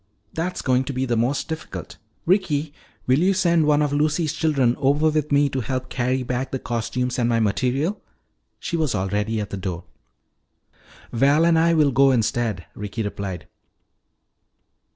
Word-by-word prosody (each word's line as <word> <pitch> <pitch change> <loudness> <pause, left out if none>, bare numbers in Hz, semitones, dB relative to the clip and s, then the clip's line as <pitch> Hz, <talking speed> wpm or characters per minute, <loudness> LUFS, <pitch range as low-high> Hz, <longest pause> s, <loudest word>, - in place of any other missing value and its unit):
"That's 175 +3 -3
going 130 0 +2
to 140 - -4
be 130 +1 -1
the 120 -2 0
most 120 +5 0
difficult. 160 0 -7 0.3
Ricky, 160 -6 +1 0.3
will 130 +3 +3
you 190 +3 +3
send 170 -4 +2
one 150 0 +4
of 145 -1 -1
Lucy's 150 +2 +1
children 135 -7 +1
over 145 +3 +2
with 150 -1 -1
me 145 0 +4
to 130 -1 -2
help 130 +1 -3
carry 130 0 -1
back 125 +2 -3
the 135 - -2
costumes 125 +1 -2
and 120 -1 +1
my 115 -1 +2
material 130 - 0 0.3
" - - -49
She 170 - -3
was 155 -8 0
already 105 +3 -1
at 105 - -5
the 100 - -4
door. 90 -2 -4 1.3
"Val 140 +7 +3
and 165 -1 +4
I 165 +1 +3
will 150 -3 +4
go 135 +2 +5
instead," 115 -6 0
Ricky 105 +2 -5
replied. 100 -3 -5
130 Hz, 170 wpm, -23 LUFS, 115-155 Hz, 1.3 s, go